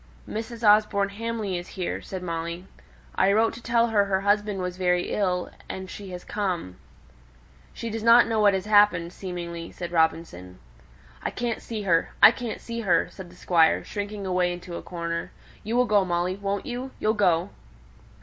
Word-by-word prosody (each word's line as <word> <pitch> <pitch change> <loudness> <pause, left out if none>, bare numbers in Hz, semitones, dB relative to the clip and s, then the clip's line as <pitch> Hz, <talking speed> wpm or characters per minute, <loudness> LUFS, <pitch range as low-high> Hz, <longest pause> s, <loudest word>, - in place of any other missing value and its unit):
"Mrs. 225 +1 -3
Osborne 205 -1 +4
Hamley 215 -3 -3
is 175 - -9
here," 180 - -2
said 185 -1 -7
Molly. 170 +1 -4 0.5
"I 195 - +3
wrote 220 +2 +3
to 235 - -10
tell 235 0 +2
her 205 -2 +3
her 190 -1 0
husband 205 0 +1
was 180 -1 -3
very 180 -1 +1
ill, 180 -3 0 0.2
and 190 0 -5
she 200 -2 -8
has 180 -1 -7
come." 180 - -3 0.9
"She 230 - -6
does 225 0 -4
not 230 +2 +7
know 225 -1 0
what 205 -2 +5
has 190 - -3
happened, 205 -5 +4
seemingly," 170 -3 -6
said 175 -1 -6
Robinson. 160 - -1 0.6
"I - - -2
can't 240 -2 -3
see 220 -3 -5
her 170 -4 +1
I - - +10
can't 240 -3 -5
see 235 0 -6
her," 180 -6 +2
said 190 -3 -10
the 175 - -16
Squire, 170 -2 +3
shrinking 205 -1 -5
away 180 -1 +1
into 175 0 -7
a - - -5
corner. 170 -1 -4 0.3
"You 225 +2 -2
will 250 0 +4
go, 210 -4 +3
Molly, 175 0 -1
won't 200 +2 -3
you? 255 0 -4
You'll 215 - +2
go." 185 -3 +2
195 Hz, 180 wpm, -25 LUFS, 175-215 Hz, 0.9 s, I